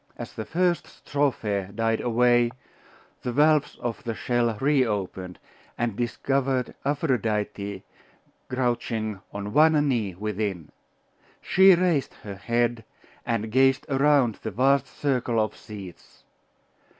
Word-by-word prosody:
As -, -, -7 dB
the 110 Hz, -, -5 dB
first 175 Hz, 0 st, 0 dB
strophe 110 Hz, -9 st, -2 dB
died 115 Hz, 0 st, 0 dB
away, 120 Hz, 0 st, +3 dB, 0.7 s
the 125 Hz, -, -3 dB
valves 150 Hz, +3 st, +3 dB
of 120 Hz, +4 st, -4 dB
the 115 Hz, -3 st, -3 dB
shell 120 Hz, -2 st, 0 dB
reopened, 105 Hz, -10 st, 0 dB, 0.4 s
and 115 Hz, -3 st, -1 dB
discovered 130 Hz, +2 st, -1 dB
Aphrodite 110 Hz, -, -1 dB, 0.7 s
crouching 115 Hz, -5 st, -2 dB
on 100 Hz, 0 st, -5 dB
one 160 Hz, +1 st, +6 dB
knee 110 Hz, -9 st, -1 dB
within. 100 Hz, -5 st, -3 dB, 0.7 s
She 190 Hz, 0 st, +6 dB
raised 170 Hz, -6 st, 0 dB
her 100 Hz, -, -6 dB
head, 115 Hz, +3 st, -1 dB, 0.4 s
and 110 Hz, -2 st, -1 dB
gazed 135 Hz, +2 st, +3 dB
around 135 Hz, -4 st, +3 dB
the 110 Hz, -, -3 dB
vast 135 Hz, +5 st, +2 dB
circle 125 Hz, -5 st, -1 dB
of 110 Hz, 0 st, 0 dB
seats. 100 Hz, -5 st, -11 dB
120 Hz, 115 wpm, -25 LUFS, 105-135 Hz, 0.7 s, one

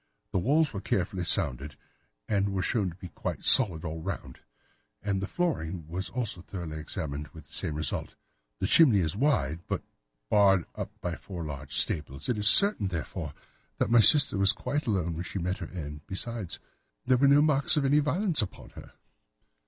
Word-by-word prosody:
The -, -, 0 dB
walls 145 Hz, -, +1 dB
were 100 Hz, -, -5 dB
carefully 90 Hz, -1 st, -2 dB
sounded, 70 Hz, -3 st, -1 dB, 0.5 s
and 100 Hz, -1 st, 0 dB
were 95 Hz, -1 st, -1 dB
shown 100 Hz, +1 st, 0 dB
to 85 Hz, -, -11 dB
be 90 Hz, -1 st, -10 dB
quite -, -, -6 dB
solid 90 Hz, -11 st, +6 dB
all 80 Hz, 0 st, -5 dB
round, 95 Hz, +2 st, -6 dB, 0.6 s
and 100 Hz, -2 st, -1 dB
the 100 Hz, -, -3 dB
flooring 90 Hz, -, -3 dB
was 90 Hz, +4 st, -5 dB
also 115 Hz, -7 st, -4 dB
thoroughly 85 Hz, -4 st, -7 dB
examined, 75 Hz, -1 st, -5 dB
with 80 Hz, -3 st, -12 dB
the -, -, -18 dB
same 75 Hz, -, -3 dB
result. 75 Hz, +1 st, -4 dB, 0.4 s
The -, -, -2 dB
chimney 120 Hz, +2 st, +5 dB
is 85 Hz, -3 st, 0 dB
wide, 105 Hz, -, 0 dB
but -, -, -2 dB
is -, -, -37 dB, 0.4 s
barred 100 Hz, -4 st, +3 dB
up -, -, -5 dB
by 85 Hz, -2 st, -4 dB
four 85 Hz, -4 st, -8 dB
large 70 Hz, -3 st, -6 dB
staples. 70 Hz, -, +2 dB
It 120 Hz, -, 0 dB
is 105 Hz, -, +3 dB
certain, 200 Hz, -, +6 dB
therefore, 85 Hz, -5 st, -5 dB, 0.4 s
that -, -, -1 dB
my 120 Hz, -, +6 dB
sister 140 Hz, -5 st, +5 dB
was 100 Hz, +1 st, +6 dB
quite 145 Hz, +5 st, -3 dB
alone 90 Hz, -6 st, -1 dB
when 85 Hz, +2 st, -5 dB
she 95 Hz, -, -6 dB
met 90 Hz, +1 st, -3 dB
her 85 Hz, -, -7 dB
end. 75 Hz, -4 st, -7 dB
Besides, 100 Hz, -2 st, -5 dB, 0.5 s
there 130 Hz, 0 st, +3 dB
were 140 Hz, +2 st, +4 dB
no 145 Hz, +2 st, +5 dB
marks 150 Hz, 0 st, +2 dB
of 145 Hz, -, +1 dB
any 145 Hz, +2 st, +4 dB
violence 160 Hz, -, +1 dB
upon 105 Hz, -, -7 dB
her." -, -, -13 dB
95 Hz, 190 wpm, -28 LUFS, 80-120 Hz, 0.6 s, solid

